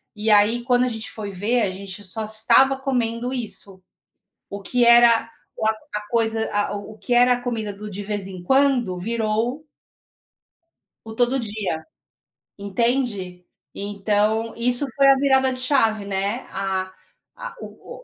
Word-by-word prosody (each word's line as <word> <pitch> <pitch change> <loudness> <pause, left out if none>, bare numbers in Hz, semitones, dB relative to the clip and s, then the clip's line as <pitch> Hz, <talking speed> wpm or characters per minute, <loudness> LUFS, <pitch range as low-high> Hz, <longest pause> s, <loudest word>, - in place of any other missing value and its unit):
E 215 +1 -2
aí, 215 +3 +4
quando 245 0 +2
a - - 0
gente 225 -2 -5
foi 205 -2 -6
ver, 220 +6 0
a 200 - +1
gente 195 +1 -8
só 215 +3 -4
estava 225 +5 +4
comendo 245 -2 -2
isso. 200 -6 -4 0.7
O 200 0 -7
que 240 +5 +1
era 235 -1 +6 0.3
o - - -2
a - - +4 0.2
a 210 - -2
coisa 225 -1 0
a 205 0 0
o 205 +1 -9
o - - -18
que 245 - -8
era 245 +1 +5
a 245 - -3
comida 225 -4 -3
do 210 +1 -8
de 205 +1 -6
vez 205 -1 -3
em 185 -2 -9
quando 265 -5 +2
virou 230 - -2 1.4
o 220 - -8
todo 245 +3 +1
dia, 210 -8 -4 0.7
entende? 200 -3 -2 0.3
Então, 205 +2 -1
isso 245 +3 +1
foi 275 -1 +5
a 275 - +7
virada 265 -1 +3
de 255 - -6
chave, 225 -6 +1
né. 200 +4 -2
A 190 -1 -3 0.4
a - - -8
o - - -11
225 Hz, 160 wpm, -22 LUFS, 205-245 Hz, 1.4 s, a